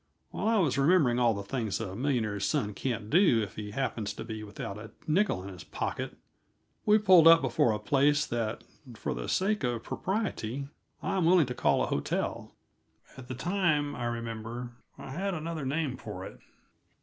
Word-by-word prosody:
While - - -2
I 225 0 +3
was 150 -8 +2
remembering 135 -5 +4
all 120 -3 +3
the 100 - -4
things 110 -1 -2
a 95 -4 -5
millionaire's 110 -5 0
son 110 -9 0
can't 115 0 -3
do 170 - +5
if 100 - -7
he 105 -1 -5
happens 110 -2 -2
to - - -6
be 110 -1 -6
without 100 -1 -6
a 110 0 -9 0.2
nickel 160 - +1
in 100 - -7
his 90 -2 -9
pocket, - - -4 0.7
we 210 0 +7
pulled 185 -6 +7
up 165 0 +9
before 120 -2 +2
a 105 - 0
place 145 +4 +2
that, 115 -2 -3 0.3
for - - -3
the - - -5
sake 210 0 +1
of 120 -2 -1
propriety, 140 - -3 0.4
I - - -1
am 180 - +2
willing 175 -2 +5
to 125 - -4
call - - +2
a - - +2
hotel; - - -2 0.6
at 130 -2 -11
the 130 - -5
time, 155 -2 0
I 120 - -4
remember, 115 +1 -4 0.3
I - - -9
had 190 +6 -2
another 160 -3 -4
name 140 -2 -1
for 105 -6 -7
it. - - -10
130 Hz, 185 wpm, -29 LUFS, 110-165 Hz, 0.7 s, up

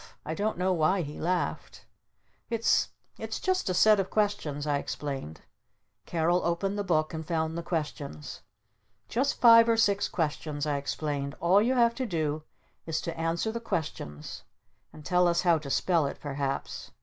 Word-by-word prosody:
I 160 - -3
don't 210 +4 -1
know 185 +1 +1
why 175 +3 +2
he 150 0 -7
laughed. 175 +1 -2 0.6
"It's 230 -1 +2 0.3
it's - - -4
just 370 - 0
a 185 - 0
set 215 +2 +6
of 195 - -1
questions," 180 -9 -1
I 145 -1 +1
explained. 135 - -5 0.7
Carol 175 +2 +1
opened 180 +4 0
the 205 - -1
Book 155 -4 +1
and 160 0 -4
found 160 0 -1
the 170 - -2
questions. 150 - -5 0.7
"Just 270 +4 0
five 230 -1 +8
or 230 - +3
six 205 -3 +2
questions," 150 -2 -2
I 145 -2 0
explained. 140 0 -3
"All 185 +4 +4
you 250 +4 +2
have 235 -1 +4
to 255 +1 -3
do 155 -5 -1 0.5
is 160 -1 -1
to 165 - -4
answer 165 +6 -1
the 235 - -4
questions 145 - -5 0.5
and 150 - -13
tell 180 0 +3
us 170 0 +2
how 170 -3 +3
to 145 -2 -8
spell 165 +1 +2
it - - -6
perhaps. 140 -1 -4
170 Hz, 170 wpm, -28 LUFS, 150-200 Hz, 0.7 s, five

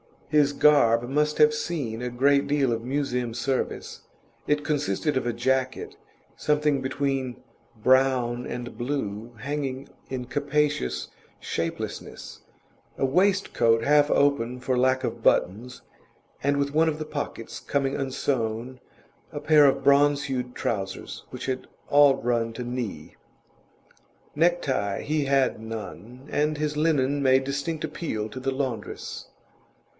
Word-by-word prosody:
His 145 -1 +3
garb 120 -6 +4
must 150 +2 +1
have 150 0 +6
seen 145 -8 -3
a 125 - -2
great 140 +3 +3
deal 140 -3 +2
of 115 -1 -1
Museum 125 -3 -1
service; 130 +2 -2 0.5
it 150 0 +1
consisted 145 -1 0
of 125 - -1
a 120 - 0
jacket, 130 - -1 0.4
something 150 -2 +1
between 135 -2 -2 0.3
brown 125 0 +2
and 120 -2 -6
blue, 120 -3 -4
hanging 140 -1 -3 0.2
in 130 -1 -4
capacious 145 - -1 0.3
shapelessness, 85 0 -5 0.6
a - - +1
waistcoat 135 - +2
half 145 +1 +4
open 125 -4 +2
for 130 0 -1
lack 130 +1 +2
of - - -3
buttons 115 +7 +1 0.6
and 140 +1 +1
with 140 0 -1
one 160 +2 +4
of 150 - -3
the 155 - -5
pockets 145 -6 -5
coming 140 -1 -1
unsewn, 130 -2 -2 0.5
a - - -3
pair 150 -1 +6
of 135 0 +1
bronze 140 +1 +4
hued 125 -3 -3
trousers 95 -4 -4
which - - -7
had 130 -1 -3 0.2
all 145 -1 +6
run 115 -1 -1
to 125 - -5
knee. 115 -11 -5 1.2
Necktie 150 - +1
he 150 -1 -1
had 135 -3 +2
none, 115 - -8
and 150 +1 +1
his 150 0 -2
linen 145 -3 +2
made 130 0 +4
distinct 140 +4 -3
appeal 150 -9 -3
to 130 - -7
the 135 +1 -1
laundress. 130 -6 -4
135 Hz, 130 wpm, -26 LUFS, 120-145 Hz, 1.2 s, have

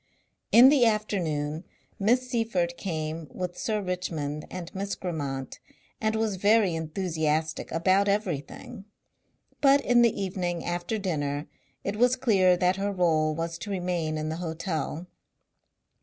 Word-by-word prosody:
In 245 +3 +9
the 280 -3 +4
afternoon 170 -9 0 0.4
Miss 245 +5 +2
Seyffert 225 -8 0
came 160 -3 -4
with 180 -1 -5
Sir 215 0 -2
Richmond 160 -5 -3
and 180 -2 -7
Miss 200 +1 -3
Grammont 140 -7 -4 0.4
and 220 0 +1
was 220 -3 0
very 205 -1 +4
enthusiastic 160 -1 -2
about 185 +4 +3
everything, 195 -2 -3 0.8
but 275 0 +6
in 240 -2 +4
the 235 -2 +3
evening 180 -3 -2
after 175 +5 -2
dinner 145 -7 -2 0.4
it 200 +1 -3
was 245 +2 +4
clear 195 -8 +3
that 180 +1 +2
her 200 +1 -1
role 160 -5 +2
was 165 +1 -4
to 210 - -7
remain 175 -5 -1
in 155 0 -3
the 160 - -3
hotel. 165 -1 -3
180 Hz, 135 wpm, -27 LUFS, 160-205 Hz, 0.8 s, In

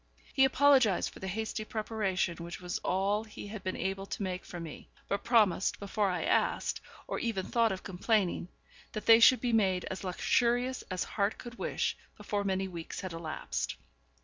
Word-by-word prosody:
He 270 - +6
apologised 265 -6 +4
for - - -13
the 190 - -5
hasty 220 +3 -3
preparation 215 -6 -1
which 170 0 -7
was 180 -1 -3
all 200 +3 +1
he 215 -2 -9
had 205 -1 -7
been 185 - -2
able 195 +1 -3
to 200 - -4
make 185 -1 -3
for 175 - -7
me, 165 -3 -8 0.2
but 200 - -1
promised, 210 -6 +3
before 200 0 0
I 180 - -1
asked, - - +1 0.3
or - - -2
even 220 -6 -1
thought 230 -2 +2
of 190 - -4
complaining, 190 -1 0 0.5
that 215 - -5
they 225 0 +8
should 255 +2 +7
be 245 -2 0
made 190 -5 +2
as 190 - -5
luxurious 245 +7 +1
as 185 -1 -1
heart 200 0 -1
could 240 -1 -10
wish - - -1 0.2
before 205 -1 -2
many 190 -1 0
weeks 170 -3 -6
had 185 -3 -5
elapsed. 160 -2 -3
200 Hz, 180 wpm, -31 LUFS, 185-225 Hz, 0.5 s, they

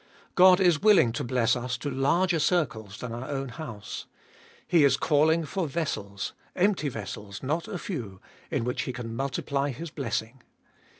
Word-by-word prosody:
God 185 0 +7
is 175 -6 +4
willing 205 - +6
to 115 - -3
bless 120 -1 +2
us 125 0 -3
to 145 +3 -4
larger 165 +6 +2
circles 125 - 0
than 125 - -6
our 120 +4 -6
own 135 -2 -3
house. 120 -7 -7 0.6
He 165 -4 +4
is 140 - +5
calling 160 +2 +3
for 175 +3 -2
vessels, 105 - -3 0.2
empty 185 -5 +2
vessels 105 -2 -7
not 160 +8 -1
a 210 -4 -4
few, 115 - -5 0.3
in - - -1
which 125 +1 -1
He 130 - -4
can 115 -2 -6
multiply 140 +2 -1
his 155 +5 -6
blessing. 120 -2 -3
135 Hz, 165 wpm, -27 LUFS, 120-165 Hz, 0.6 s, God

